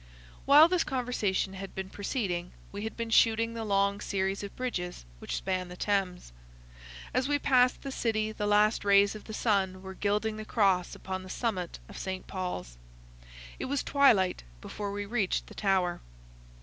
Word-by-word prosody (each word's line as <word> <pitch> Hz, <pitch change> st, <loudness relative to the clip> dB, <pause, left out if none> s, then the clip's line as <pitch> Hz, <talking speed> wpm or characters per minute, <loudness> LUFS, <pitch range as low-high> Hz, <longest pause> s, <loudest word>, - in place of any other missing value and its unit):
While 295 Hz, +3 st, +9 dB
this 355 Hz, -1 st, +2 dB
conversation 240 Hz, -7 st, -1 dB
had 195 Hz, 0 st, -8 dB
been 190 Hz, 0 st, -5 dB
proceeding, 195 Hz, -5 st, -3 dB, 0.2 s
we 205 Hz, +1 st, -5 dB
had 220 Hz, -, -6 dB
been 230 Hz, -1 st, -4 dB
shooting 230 Hz, +1 st, +4 dB
the 230 Hz, -1 st, -4 dB
long 200 Hz, -1 st, +1 dB
series 195 Hz, 0 st, -1 dB
of 200 Hz, -1 st, -7 dB
bridges 180 Hz, -, -4 dB
which -, -, -4 dB
span 185 Hz, -1 st, -2 dB
the 180 Hz, 0 st, -10 dB
Thames. 185 Hz, -, -1 dB, 0.8 s
As 255 Hz, +1 st, +1 dB
we 290 Hz, 0 st, +2 dB
passed 255 Hz, -3 st, +3 dB
the 275 Hz, -, -4 dB
City 215 Hz, -4 st, -1 dB
the 210 Hz, -1 st, -3 dB
last 210 Hz, +1 st, +3 dB
rays 200 Hz, 0 st, +5 dB
of 215 Hz, -, -10 dB
the 220 Hz, -, -8 dB
sun 190 Hz, -4 st, 0 dB
were 190 Hz, 0 st, -7 dB
gilding 210 Hz, +2 st, -1 dB
the 215 Hz, -, -5 dB
cross 195 Hz, -5 st, +1 dB
upon 190 Hz, 0 st, -5 dB
the 185 Hz, -, -11 dB
summit 185 Hz, -6 st, -2 dB
of -, -, -9 dB
St. 190 Hz, -1 st, -4 dB
Paul's. 90 Hz, -, -5 dB, 0.8 s
It -, -, -3 dB
was 280 Hz, +1 st, -1 dB
twilight 230 Hz, -10 st, +4 dB, 0.2 s
before 200 Hz, -, -5 dB
we 205 Hz, 0 st, -4 dB
reached 205 Hz, -3 st, 0 dB
the -, -, -13 dB
Tower. 190 Hz, -3 st, 0 dB
205 Hz, 175 wpm, -29 LUFS, 190-225 Hz, 0.8 s, While